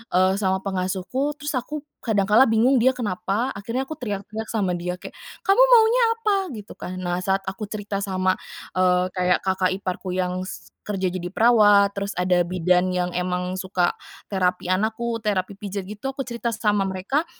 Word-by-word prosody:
eee, 185 +1 +4
sama 190 -2 +1
pengasuhku, 195 +9 -2
terus 295 +1 -2
aku 285 +4 -5 0.2
kadang 205 -4 +1
kala 225 +6 +7
bingung, 230 +4 +3
dia 255 +2 +4
kenapa? 220 0 -1
Akhirnya 230 +2 -3
aku 315 - -5
teriak-teriak 215 -2 -5
sama 190 -5 0
dia, 180 +1 -3
kayak, - - -9 0.3
"Kamu 395 -5 +3 0.2
maunya 460 +1 +6
apa?" 435 -3 +1 0.2
Gitu 210 -2 -9
kan. 185 0 -6
Nah, 175 -1 -1
saat 190 +2 0
aku 205 +3 -5
cerita 205 -1 -4
sama, 185 -1 0 0.4
eee, 180 0 +3
kayak, 180 -1 +1
kakak 190 -1 +1
iparku 185 -1 -4
yang 185 0 -1
s 185 - -9 0.2
kerja 190 -3 -1
jadi 180 0 -5
perawat, 205 -3 +5
terus 200 +1 -2
ada 180 -1 +2
bidan 180 +1 +2
yang 180 0 0
emang 180 +1 -2
suka 185 -1 0 0.3
terapi 180 -2 0
anakku, 220 +5 0
terapi 200 -3 -2
pijat, 200 -1 -4
gitu. 210 +8 -6
Aku 270 - -4
cerita 235 -2 -3
sama 205 -2 +1
mereka 195 - -1
195 Hz, 170 wpm, -23 LUFS, 185-225 Hz, 0.4 s, kala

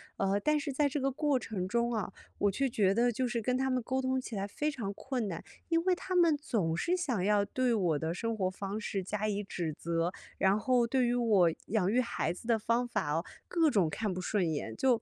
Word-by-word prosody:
呃， 195 +1 +1
但 300 +7 +2
是 285 -1 -3
在 285 +2 +2
这 280 +1 -2
个 270 +1 +1
过 285 0 +1
程 200 -6 -3
中 235 +3 0
啊， 205 -4 -2 0.2
我 205 - +2
却 270 +6 0
觉 195 -4 +2
得 240 +3 +3
就 255 +3 -1
是 240 -1 -2
跟 250 +3 0
他 265 0 0
们 255 -2 0
沟 260 +2 -1
通 260 0 0
起 245 - -7
来 195 -1 -2
非 300 +9 -1
常 215 -8 -4
困 250 0 -3
难， 170 -4 -5 0.2
因 330 0 +2
为 370 - +3
他 370 +1 -3
们 335 -4 +5
总 200 - -1
是 345 - +1
想 265 - -1
要 205 0 +3
对 250 +4 0
我 175 -9 +1
的 160 +1 -2
生 230 +4 -2
活 185 -2 +1
方 195 +2 -5
式 195 -3 -3
加 210 +3 -2
以 205 -1 -1
指 170 -5 -3
责， 170 +1 -1 0.2
然 195 +1 +3
后 245 +1 +2
对 255 +1 +2
于 240 - +1
我 215 -8 +4 0.2
养 205 -3 +1
育 245 - +3
孩 235 -9 -1
子 180 +6 -9
的 230 -2 +4
方 230 +3 0
法 210 -10 -1
哦， 165 +4 0 0.2
各 330 -3 +3
种 195 - +2
看 210 +4 -2
不 185 - -4
顺 180 -3 0
眼。 145 -7 -3
就 245 -4 +3
225 Hz, 265 characters per minute, -31 LUFS, 195-260 Hz, 0.2 s, 们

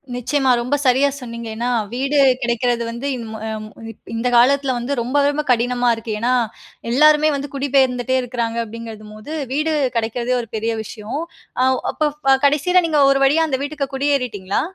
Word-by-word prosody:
நிச்சயமா. 260 +2 +1
ரொம்ப 250 +4 0
சரியா 260 +3 +4
சொன்னீங்க. 235 -1 -7
ஏன்னா, 240 +2 -2 0.2
வீடு 275 +3 0 0.2
கெடைக்கிறது 240 0 0
வந்து 235 +4 -5
இன் 235 -2 -6
மொ 220 - -6 0.5
ய - - -8 0.2
இந்த 235 +2 -1
காலத்துல 265 +1 +4
வந்து, 240 +4 -4
ரொம்ப 280 +4 +1
ரொம்ப 295 +1 0
கடினமா 245 +1 +1
இருக்கு. 225 -1 -5
ஏன்னா, 245 +3 +1 0.6
எல்லாருமே 305 +3 +5
வந்து 280 0 -4
குடிபெயர்ந்துட்டே 260 -2 +1
இருக்காங்க 235 -2 -3
அப்டிங்குறதும் 220 -1 -9
போது 250 +9 -9 0.2
வீடு 310 +2 0 0.2
கிடைக்கிறதே 235 +2 -1
ஒரு 230 - -11
பெரிய 225 +1 -1
விஷயம். 220 +7 -6 0.4
அ - - +4 0.3
அப்போ 305 - 0 0.4
கடைசில 345 +6 +3
நீங்க 305 -2 +1
ஒரு 275 0 +1
வழியா 320 +4 +3
அந்த 265 -1 -1
வீட்டுக்கு 285 -2 -4
குடியேறிட்டீங்களா? 250 -9 -1
250 Hz, 160 wpm, -20 LUFS, 235-280 Hz, 0.6 s, எல்லாருமே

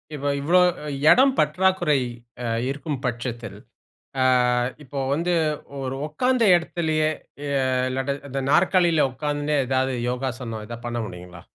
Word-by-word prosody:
இப்ப 145 -1 -6 0.2
இவ்ளோ 175 +6 +4 0.5
எடம் 265 +1 +5
பற்றாக்குறை 180 -6 +2 0.4
அ - - -3 0.2
இருக்கும் 140 0 -4
பட்சத்தில், 120 -2 -4 0.6
ஆ - - +4 0.6
இப்போ 140 0 -6
வந்து 170 +4 0 0.5
ஒரு 130 0 -3
உக்காந்த 250 +10 +1
எடத்திலயே, 160 -2 -1 0.4
எ - - -3 0.4
இல்லாட்டா, 135 +2 -2
இந்த 135 +1 -3
நாற்காலில 170 -3 +4
உக்காந்துண்டே 145 +2 -2
ஏதாவது 130 0 0 0.2
யோகாசனம் 125 -3 -4
எதா 120 - -6
பண்ண 120 0 -3
முடியுங்களா? 90 -1 -11
140 Hz, 120 wpm, -23 LUFS, 125-165 Hz, 0.6 s, எடம்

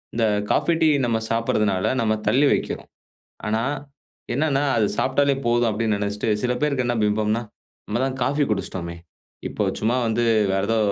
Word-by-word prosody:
இந்த 115 - +2 0.3
coffee 170 - +2
tea 160 - +5 0.2
நம்ம 115 -2 +1
சாப்பிடுறதுனால, 105 -4 +1
நம்ம 110 -1 +2
தள்ளி 140 +3 +4
வைக்கிறோம். - - -3 0.6
ஆனா, 110 +1 0 0.7
என்னென்னா 145 -1 +1
அது 110 - +3
சாப்ட்டாலே 140 +1 +2
போதும் 120 0 +3
அப்படின்னு 110 0 0
நினச்சுட்டு, 105 +1 -2
சில 125 - +1
பேருக்கு 140 -4 +1
என்ன 120 - +1
பிம்பம்ன்னா, 105 +2 +1 0.4
"நம்ம 110 +3 -1
தான் 135 -1 -2
காஃபி 145 +4 +2
குடிச்ட்டோமே, 90 -4 -3 0.5
இப்ப - - -1
சும்மா 115 +4 +1
வந்து 120 +2 +1 0.3
வேற 95 - +1
ஏதோ 115 - +2
115 Hz, 155 wpm, -23 LUFS, 105-130 Hz, 0.7 s, tea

